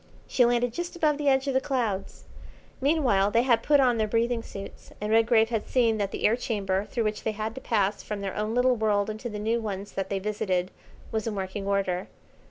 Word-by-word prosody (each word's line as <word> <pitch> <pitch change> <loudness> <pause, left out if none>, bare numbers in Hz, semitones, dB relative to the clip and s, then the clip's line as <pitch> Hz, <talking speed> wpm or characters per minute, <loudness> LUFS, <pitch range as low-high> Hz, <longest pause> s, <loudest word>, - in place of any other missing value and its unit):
She 250 - +3
landed 240 0 +1
just 350 +4 -4
above 305 -3 +1
the 290 -1 +2
edge 265 0 +3
of 275 - 0
the 265 - +2
clouds. 240 -9 -2 0.6
Meanwhile 260 -10 +3
they 230 +3 +3
had 235 -3 +3
put 290 +3 +4
on 250 -3 +4
their 215 - +1
breathing 230 +2 +1
suits, 195 -3 -10
and 210 +1 -3
Redgrave 225 0 +4
had 225 -3 -2
seen 230 -4 +2
that 200 -1 0
the - - -3
air 220 - +5
chamber 200 -5 -1
through 230 +2 -2
which 215 0 -2
they 220 - -2
had 215 +1 -4
to 265 - -8
pass 205 -2 0
from 210 -1 -5
their 195 -1 -4
own 215 +2 -2
little 250 0 +4
world 215 -2 +1
into 215 +3 -6
the 210 - -5
new 225 +3 0
ones 200 -2 -5
that 195 -1 -3
they 195 - -1
visited 190 -2 -1 0.4
was 220 0 -2
in 220 - -2
working 195 +1 -4
order. 195 -2 0
220 Hz, 225 wpm, -27 LUFS, 200-245 Hz, 0.6 s, air